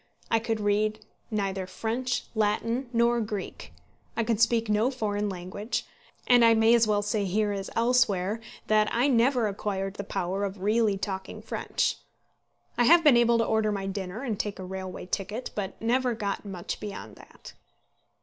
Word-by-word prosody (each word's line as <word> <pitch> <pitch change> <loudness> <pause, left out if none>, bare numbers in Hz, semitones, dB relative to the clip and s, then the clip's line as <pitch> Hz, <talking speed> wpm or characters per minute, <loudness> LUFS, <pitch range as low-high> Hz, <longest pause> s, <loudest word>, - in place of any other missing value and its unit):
I 225 - +4
could 225 -1 -2
read 210 +1 0 0.2
neither 195 -3 -2
French, 235 +6 -2
Latin, 230 +4 0
nor 235 0 +3
Greek. 210 -3 -5 0.5
I 230 - +2
could 225 -1 0
speak 230 -1 +3
no 215 +3 +2
foreign 210 -5 -2
language, 190 +4 -4 0.4
and 245 -1 +6
I 230 0 +6
may 225 +1 +5
as 235 -2 +4
well 205 -1 +1
say 205 0 0
here 205 +2 +1
as 195 -1 -4
elsewhere 225 -4 +2 0.2
that 215 0 +3
I 245 +4 +2
never 245 -2 +3
acquired 195 -1 -3
the 200 - -3
power 190 +1 -2
of 195 -1 -4
really 215 -1 +2
talking 190 -1 -5
French. - - -1 0.8
I 240 - +5
have 335 +5 +7
been 295 -5 +7
able 235 0 +4
to 230 - +2
order 220 -1 +1
my 200 -1 -3
dinner 195 +3 -4
and 225 -6 -3
take 205 -1 -3
a 185 - -7
railway 190 -1 -6
ticket, 205 +6 -4
but 200 -2 -4
never 245 +1 +1
got 205 -2 -3
much 185 -3 -5
beyond 210 -1 -7
that. - - -14
215 Hz, 170 wpm, -27 LUFS, 200-235 Hz, 0.8 s, have